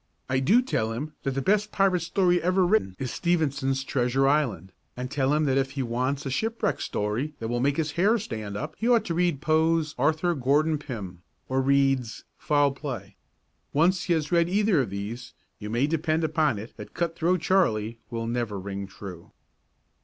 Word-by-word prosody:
I 130 Hz, 0 st, +1 dB
do 205 Hz, -, +4 dB
tell 110 Hz, -, -1 dB
him 150 Hz, +7 st, -5 dB
that 135 Hz, -1 st, -2 dB
the 135 Hz, -, -1 dB
best 210 Hz, +4 st, +2 dB
pirate 195 Hz, -2 st, +2 dB
story 180 Hz, +1 st, +2 dB
ever 185 Hz, +1 st, +2 dB
written 175 Hz, -, +1 dB
is 130 Hz, -2 st, -4 dB
Stevenson's 140 Hz, -6 st, 0 dB
"Treasure 135 Hz, +1 st, +1 dB
Island" 135 Hz, -10 st, 0 dB, 0.3 s
and 125 Hz, +1 st, -5 dB
tell 140 Hz, -1 st, +1 dB
him 150 Hz, +1 st, +2 dB
that 135 Hz, -1 st, +2 dB
if 135 Hz, 0 st, -2 dB
he 135 Hz, -1 st, -2 dB
wants 130 Hz, +4 st, -2 dB
a 135 Hz, -, -2 dB
shipwreck 225 Hz, -, -1 dB
story 115 Hz, +9 st, -2 dB
that 115 Hz, -, -5 dB
will 120 Hz, 0 st, -1 dB
make 140 Hz, +3 st, +1 dB
his 155 Hz, -2 st, 0 dB
hair 200 Hz, +9 st, +3 dB
stand 110 Hz, -, -5 dB
up 150 Hz, +7 st, -5 dB
he 230 Hz, -, +1 dB
ought 230 Hz, -3 st, +4 dB
to 170 Hz, -, -2 dB
read 170 Hz, -4 st, +1 dB
Poe's 160 Hz, 0 st, +2 dB
"Arthur 160 Hz, +3 st, +2 dB
Gordon 150 Hz, +2 st, +2 dB
Pym" 100 Hz, -, -7 dB, 0.3 s
or 130 Hz, 0 st, +1 dB
Reade's 135 Hz, -3 st, +1 dB
"Foul 145 Hz, -1 st, +2 dB
Play." 125 Hz, -8 st, -6 dB, 0.6 s
Once 175 Hz, +5 st, +2 dB
he 175 Hz, -, +2 dB
has 155 Hz, -2 st, -1 dB
read 170 Hz, -1 st, +3 dB
either 200 Hz, -4 st, +3 dB
of 120 Hz, -, -3 dB
these, 105 Hz, +5 st, -6 dB, 0.2 s
you 105 Hz, -, -6 dB
may 120 Hz, +5 st, +1 dB
depend 160 Hz, +1 st, 0 dB
upon 155 Hz, -6 st, +1 dB
it 110 Hz, +4 st, -9 dB
that -, -, -10 dB
"Cut 170 Hz, -1 st, -1 dB
Throat 175 Hz, +1 st, +1 dB
Charley" 115 Hz, -, +1 dB
will 115 Hz, -2 st, -3 dB
never 115 Hz, -4 st, -2 dB
ring 100 Hz, +1 st, -5 dB
true. 95 Hz, -3 st, -10 dB
140 Hz, 190 wpm, -26 LUFS, 120-170 Hz, 0.6 s, do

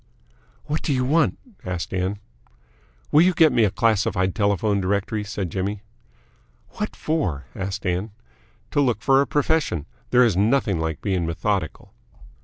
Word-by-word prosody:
"What 150 Hz, +1 st, -2 dB
do -, -, -2 dB
you 125 Hz, 0 st, 0 dB
want?" 155 Hz, +4 st, +2 dB, 0.3 s
asked 90 Hz, -1 st, -4 dB
Ann. 95 Hz, +2 st, -1 dB, 0.9 s
"Will 150 Hz, -, +6 dB
you 180 Hz, 0 st, +4 dB
get 160 Hz, -2 st, +6 dB
me 120 Hz, -3 st, +4 dB
a -, -, +2 dB
Classified 95 Hz, -3 st, +1 dB
Telephone 100 Hz, -1 st, +1 dB
Directory," 100 Hz, +3 st, -1 dB
said 100 Hz, -4 st, -4 dB
Jimmy. 100 Hz, +3 st, -3 dB, 0.9 s
"What -, -, -5 dB
for?" 115 Hz, -, -2 dB
asked 95 Hz, 0 st, -5 dB
Ann. 90 Hz, +4 st, -1 dB, 0.6 s
"To 145 Hz, -, +2 dB
look 125 Hz, -4 st, 0 dB
for 135 Hz, 0 st, +5 dB
a 140 Hz, -, 0 dB
profession. 145 Hz, -, 0 dB, 0.2 s
There 125 Hz, 0 st, +5 dB
is 110 Hz, -7 st, +1 dB
nothing 105 Hz, -2 st, +2 dB
like 80 Hz, -2 st, -3 dB
being 95 Hz, -4 st, 0 dB
methodical." 85 Hz, 0 st, -2 dB
100 Hz, 150 wpm, -23 LUFS, 95-125 Hz, 0.9 s, Will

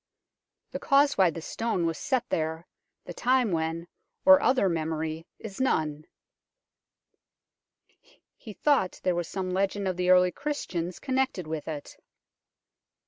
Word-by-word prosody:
The -, -, -4 dB
cause 280 Hz, +1 st, +3 dB
why 190 Hz, -2 st, +4 dB
this 165 Hz, 0 st, -7 dB
stone 225 Hz, -7 st, -1 dB
was 165 Hz, -1 st, -1 dB
set 255 Hz, -2 st, -1 dB
there, 160 Hz, +1 st, -2 dB, 0.4 s
the -, -, -7 dB
time 250 Hz, -3 st, +2 dB
when, 165 Hz, +1 st, -2 dB, 0.4 s
or 285 Hz, 0 st, +8 dB
other 255 Hz, -5 st, +3 dB
memory 160 Hz, -1 st, -3 dB
is 220 Hz, +2 st, -7 dB
none." 155 Hz, -, 0 dB, 2.3 s
He 220 Hz, -, -11 dB
thought 275 Hz, -7 st, +1 dB
there 180 Hz, -, +2 dB
was 175 Hz, -1 st, -2 dB
some 185 Hz, -1 st, -4 dB
legend 195 Hz, +1 st, -1 dB
of 185 Hz, -1 st, -2 dB
the 180 Hz, 0 st, 0 dB
early 180 Hz, 0 st, +5 dB
Christians 185 Hz, -, -4 dB
connected 260 Hz, -, -1 dB
with 155 Hz, -1 st, -5 dB
it. 150 Hz, -3 st, -7 dB
180 Hz, 135 wpm, -27 LUFS, 165-245 Hz, 2.3 s, or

